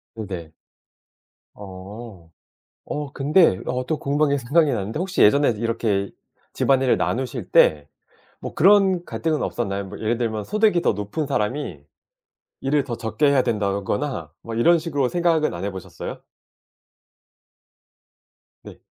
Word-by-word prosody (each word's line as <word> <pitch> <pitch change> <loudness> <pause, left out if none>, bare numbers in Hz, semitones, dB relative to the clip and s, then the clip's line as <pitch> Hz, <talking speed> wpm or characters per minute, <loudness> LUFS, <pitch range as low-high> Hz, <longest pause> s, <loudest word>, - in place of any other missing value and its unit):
네네. 95 -7 -6 1.0
어. 95 -1 -10 0.6
어 145 -2 -5
근데 145 - +3
어 125 0 -2
또 155 +1 -1
궁금한 145 +1 +1
게 140 - +2
생각이 145 +5 +2
나는데 110 0 -3
혹시 190 +2 0
예전에도 120 0 +4
이렇게 110 -4 -1 0.4
집안일을 135 -2 +2
나누실 125 -5 -3
때 75 -2 +4 0.5
뭐 - - -6
그런 190 0 +4
갈등은 160 -2 -2
없었나요? 100 -4 -2
뭐 100 +1 -9
예를 115 +2 0
들면 110 -3 -2
소득이 210 - +2
더 - - +2
높은 105 +10 -3
사람이 125 - -2 0.8
일을 140 +1 +1
더 120 -4 -4
적게 115 +6 0
해야 140 -2 +4
된다거나 100 - -2
뭐 115 - -6
이런 170 +10 +4
식으로 145 -5 -1
생각은 165 -1 +1
안 85 +2 -5
해 100 - -1
보셨어요? 95 -1 -8 2.4
네. - - -12
125 Hz, 275 characters per minute, -22 LUFS, 105-150 Hz, 2.4 s, 예전에도